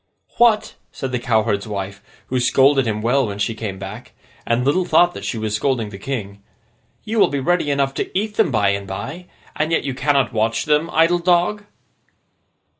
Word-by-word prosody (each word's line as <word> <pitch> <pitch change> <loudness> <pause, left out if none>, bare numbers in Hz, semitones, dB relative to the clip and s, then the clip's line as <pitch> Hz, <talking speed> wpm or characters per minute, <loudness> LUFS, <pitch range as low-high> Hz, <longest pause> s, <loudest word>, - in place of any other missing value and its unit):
'What!' 230 -3 +4 0.2
said 135 -2 -5
the 125 - -1
cowherd's 110 -3 0
wife, 100 -1 -5 0.3
who 130 - 0
scolded 130 +1 +3
him 105 -1 -2
well 125 +2 +2
when 100 -1 -5
she 105 +2 -1
came 105 -3 -5
back, 100 +5 -9 0.3
and 120 +2 +1
little 150 +7 +2
thought 175 +1 +2
she 115 - -3
was 110 -1 -3
scolding 115 -2 -1
the 95 -2 -10
King, 100 -5 -5 0.6
'you 220 +1 -2
will - - +6
be 140 - -2
ready 170 +2 +1
enough 140 -1 +1
to - - -3
eat 210 +2 -1
them 215 -5 +3
by 105 -6 +2
and 100 0 -2
by, 145 - -6 0.3
and 155 +1 -1
yet 165 - +1
you 135 - -3
cannot 140 -1 +1
watch 115 +1 0
them, 150 +2 +2
idle 165 +2 +3
dog? 180 +4 +1
130 Hz, 190 wpm, -20 LUFS, 110-165 Hz, 0.6 s, will